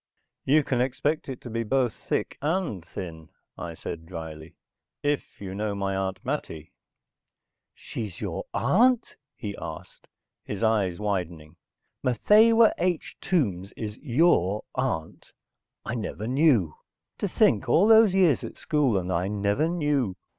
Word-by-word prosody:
"You 150 Hz, +3 st, +4 dB
can 125 Hz, -3 st, 0 dB
expect 135 Hz, +4 st, -1 dB
it 130 Hz, -, -5 dB
to 120 Hz, -, -8 dB
be 115 Hz, +1 st, -1 dB
both 125 Hz, +1 st, +1 dB
thick -, -, -3 dB
and 155 Hz, -, -1 dB
thin," 80 Hz, -2 st, -8 dB, 0.3 s
I 85 Hz, -1 st, -6 dB
said 80 Hz, 0 st, -7 dB
drily. 80 Hz, -2 st, -8 dB, 0.5 s
"If 145 Hz, 0 st, -2 dB
you 95 Hz, -2 st, -6 dB
know 105 Hz, +1 st, -2 dB
my 100 Hz, -1 st, -1 dB
Aunt 95 Hz, +4 st, -3 dB
Mattie." 80 Hz, -, -4 dB, 1.0 s
"She's 105 Hz, -6 st, -6 dB
your -, -, -4 dB
aunt?" 235 Hz, -, +2 dB, 0.2 s
he 100 Hz, -3 st, -6 dB
asked, 80 Hz, -, -9 dB, 0.4 s
his 105 Hz, +2 st, -5 dB
eyes 105 Hz, -6 st, +2 dB
widening. 85 Hz, -6 st, -3 dB, 0.5 s
"Matthewa 220 Hz, -, +5 dB
H. 175 Hz, -1 st, -1 dB
Tombs 100 Hz, -, 0 dB
is 105 Hz, -1 st, -6 dB
your 120 Hz, -, +2 dB
aunt. 125 Hz, -12 st, -3 dB, 0.5 s
I -, -, -3 dB
never 110 Hz, -2 st, -4 dB
knew. 125 Hz, -, +3 dB, 0.5 s
To -, -, 0 dB
think, 115 Hz, +4 st, +2 dB
all 165 Hz, +10 st, +5 dB
those 220 Hz, -3 st, +6 dB
years 175 Hz, -8 st, +4 dB
at -, -, -7 dB
school, 140 Hz, -9 st, +1 dB
and 90 Hz, 0 st, -2 dB
I 90 Hz, +1 st, 0 dB
never 105 Hz, +9 st, 0 dB
knew. 145 Hz, -, 0 dB
110 Hz, 140 wpm, -26 LUFS, 95-150 Hz, 1.0 s, those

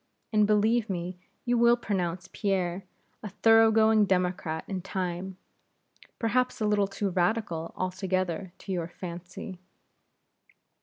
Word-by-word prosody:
And 210 Hz, -1 st, +4 dB
believe 215 Hz, +2 st, +2 dB
me 180 Hz, -1 st, -4 dB, 0.3 s
you 240 Hz, -1 st, +2 dB
will 235 Hz, 0 st, +5 dB
pronounce 185 Hz, -5 st, -2 dB
Pierre 190 Hz, -3 st, -1 dB, 0.4 s
a 210 Hz, -, -6 dB
thoroughgoing 220 Hz, +1 st, +5 dB
Democrat 180 Hz, -3 st, -1 dB
in 190 Hz, -2 st, -3 dB
time; 185 Hz, 0 st, -4 dB, 0.8 s
perhaps 250 Hz, +2 st, 0 dB
a 215 Hz, -, 0 dB
little 210 Hz, -1 st, +2 dB
too 195 Hz, 0 st, -2 dB
Radical 175 Hz, -2 st, 0 dB
altogether 185 Hz, -1 st, -2 dB
to -, -, -8 dB
your 175 Hz, -3 st, -1 dB
fancy. 180 Hz, +1 st, -8 dB
190 Hz, 115 wpm, -28 LUFS, 180-215 Hz, 0.8 s, will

